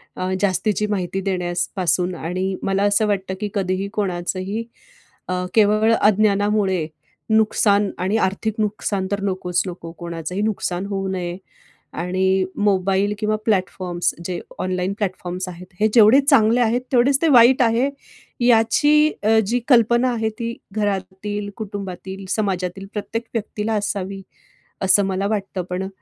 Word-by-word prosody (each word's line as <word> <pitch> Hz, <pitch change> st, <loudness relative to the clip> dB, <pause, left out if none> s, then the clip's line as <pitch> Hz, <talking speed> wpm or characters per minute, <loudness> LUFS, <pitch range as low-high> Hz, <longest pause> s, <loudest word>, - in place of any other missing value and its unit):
अ, 185 Hz, 0 st, -2 dB
जास्तीची 210 Hz, +2 st, +1 dB
माहिती 195 Hz, -1 st, -2 dB
देण्यास 180 Hz, -2 st, -1 dB
पासून 180 Hz, 0 st, 0 dB
आणि 185 Hz, +4 st, -2 dB
मला 195 Hz, +1 st, +1 dB
असं 205 Hz, +1 st, +3 dB
वाटतं 190 Hz, -2 st, -1 dB
की 210 Hz, -, -2 dB
कधीही 190 Hz, 0 st, -1 dB
कोणाचंही, 190 Hz, +1 st, -2 dB, 0.6 s
अ, 180 Hz, 0 st, -2 dB
केवळ 215 Hz, +1 st, +4 dB
अज्ञानामुळे 205 Hz, -3 st, +2 dB, 0.5 s
नुकसान 210 Hz, -2 st, +3 dB
आणि 190 Hz, +4 st, 0 dB
आर्थिक 210 Hz, +2 st, 0 dB
नुकसान 205 Hz, -2 st, -1 dB
तर 200 Hz, 0 st, -1 dB
नकोच 180 Hz, -2 st, -1 dB
नको 170 Hz, -2 st, -7 dB
कोणाचंही 170 Hz, +2 st, -5 dB
नुकसान 195 Hz, -3 st, -2 dB
होऊ 195 Hz, -1 st, -3 dB
नये. 180 Hz, -1 st, -3 dB, 0.6 s
आणि 190 Hz, +2 st, +1 dB
मोबाईल 195 Hz, 0 st, +1 dB
किंवा 215 Hz, 0 st, 0 dB
प्लॅटफॉर्म्स 185 Hz, -4 st, 0 dB
जे 180 Hz, -1 st, -3 dB, 0.2 s
ऑनलाईन 185 Hz, +1 st, -1 dB
प्लॅटफॉर्म्स 185 Hz, -2 st, -3 dB
आहेत, 180 Hz, +1 st, -9 dB
हे 215 Hz, -, +4 dB
जेवढे 230 Hz, +3 st, +7 dB
चांगले 245 Hz, -5 st, +4 dB
आहेत 240 Hz, +1 st, +2 dB
तेवढेच 270 Hz, +2 st, +3 dB
ते 330 Hz, -, +3 dB
वाईट 250 Hz, -1 st, +6 dB
आहे, 240 Hz, +3 st, +3 dB, 0.6 s
याची 290 Hz, +7 st, +4 dB
अ, 220 Hz, +1 st, +4 dB
जी 240 Hz, +4 st, +1 dB
कल्पना 240 Hz, 0 st, +4 dB
आहे 225 Hz, -1 st, -1 dB
ती 230 Hz, 0 st, -3 dB, 0.2 s
घरातील, 205 Hz, 0 st, -3 dB
कुटुंबातील, 195 Hz, -2 st, -6 dB
समाजातील 195 Hz, -2 st, -2 dB
प्रत्येक 225 Hz, +2 st, -4 dB
व्यक्तीला 220 Hz, -1 st, -2 dB
असावी 200 Hz, -2 st, -2 dB, 0.6 s
असं 190 Hz, +1 st, +4 dB
मला 195 Hz, +1 st, -1 dB
वाटतं. 200 Hz, -3 st, -2 dB
पण 185 Hz, +1 st, -3 dB
200 Hz, 135 wpm, -21 LUFS, 185-215 Hz, 0.6 s, जेवढे